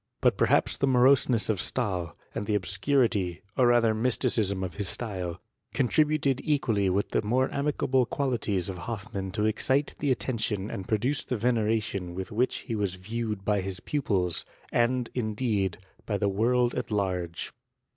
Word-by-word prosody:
But - - +3
per - - +2
hi^ - - +2
the 140 - +2
moroseness 130 -2 +4
of 105 -4 0
Stahl, 95 -9 -2 0.2
and 105 - -4
the 105 - +1
obscurity, 100 -2 +1
or 125 - +4
ra^r 115 -2 +4
mysticism 110 -4 +1
of 90 -3 -4
his 100 -4 -1
style, 95 -7 -3 0.4
contributed 145 0 +2
equally 115 -10 +1
with 100 +2 0
the - - +2
more 125 +5 +1
amiable 135 -3 +1
qualities 115 -10 -1
of 95 -2 -5
Hofimann 100 -2 -5
to 105 0 0
excite 130 +6 +1
the 145 - 0
attention 110 -6 -1
and 95 - -5
produce 120 +7 0
the 125 - -2
veneration 105 -5 0
with 95 +4 -5
which 120 +4 0
he 120 - -4
was 100 -4 -1
viewed 105 +1 -4
by 105 -2 +2
his 95 0 -4
pupils, 95 - 0 0.3
and, 120 +1 +1
indeed, 110 -5 -1 0.3
by 105 - 0
the 100 0 +1
world 120 +4 +2
at - - -3
large. 90 -5 -2
110 Hz, 160 wpm, -28 LUFS, 95-125 Hz, 0.4 s, moroseness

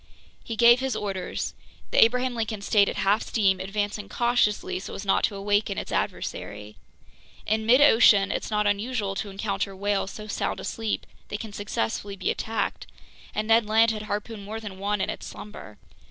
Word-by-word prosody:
He 230 - -5
gave 235 +2 +7
his 265 0 -1
orders. 195 -3 -3 0.4
The - - +7
Abraham 250 +2 +2
Lincoln 220 -3 -3
stayed 200 -1 +4
at - - -4
half 205 +3 +2
steam, 195 -4 +1
advancing 205 +1 -3
cautiously 235 -6 +1
so 190 - -7
as 200 - -6
not 195 - +2
to 205 - -4
awaken 205 +1 0
its - - -4
adversary. 105 +1 -4 0.7
In 220 0 0
midocean 230 -6 +6
it's - - -3
not 210 -1 +1
unusual 205 0 0
to 200 +1 -4
encounter 195 0 -3
whales 200 0 -1
so 215 +2 -8
sound 215 - -2
asleep 225 -1 -3 0.2
they 205 - -4
can 215 -1 -8
successfully 200 - -3
be 190 - -1
attacked, 225 0 -3 0.5
and 215 0 -1
Ned 225 -1 +4
Land 225 +1 +4
had 215 -1 -4
harpooned 210 +1 -4
more 215 +2 -5
than 200 -4 -8
one 205 0 -1
in - - 0
its - - -7
slumber. 205 - -10
210 Hz, 175 wpm, -26 LUFS, 200-225 Hz, 0.7 s, gave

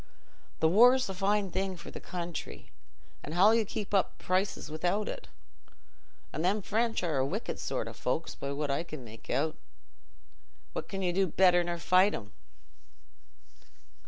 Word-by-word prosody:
Th' 160 - +5
war's 245 +8 +6
a - - -3
fine 195 +1 +1
thing 190 0 -2
for - - -10
the - - -7
country, 175 -1 -6 0.5
an' 150 - -7
how'll 195 +6 +6
you 230 0 +3
keep 205 0 -5
up 195 - +2
prices 185 0 -1
wi'out 175 +7 0
it? - - -6 1.1
An' 155 - -2
them 195 +4 +1
French 225 0 0
are 160 -5 0
a 130 - +3
wicked 135 - -3
sort - - -2
o' - - -7
folks, - - -2
by 140 - -5
what 145 0 -2
I 140 - 0
can 155 -5 -8
make 110 -1 -13
out. 155 +2 0 1.2
What - - -5
can 195 -1 -3
you 175 -1 +1
do 190 +1 +2
better 175 +1 +4
nor 175 0 -3
fight 185 +4 +4
'em?" 105 -1 -8
185 Hz, 165 wpm, -30 LUFS, 160-200 Hz, 1.2 s, war's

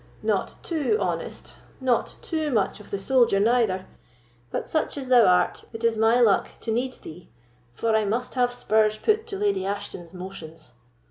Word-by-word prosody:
"Not - - 0
too 330 +5 0
honest, - - -4 0.2
not 255 -3 0
too 315 -2 -2
much 215 -5 0
of 210 - -14
the 200 - -2
soldier 235 -1 +3
neither; 215 -4 +2 0.6
but - - -3
such 315 -2 -1
as 265 -2 -6
thou 245 -3 +7
art, 180 0 +2
it 225 +1 -7
is 230 -1 +3
my 225 +2 +3
luck 220 -5 +3
to 225 - -3
need 250 +3 -1
thee, 165 +2 -11 0.5
for 225 - +1
I 220 - +3
must 230 +5 -2
have 245 -1 +2
spurs 215 -3 +2
put 435 - +1
to 395 - -5
Lady 405 - 0
Ashton's 190 -3 -5
motions." 180 -3 -10
225 Hz, 175 wpm, -25 LUFS, 200-255 Hz, 0.6 s, thou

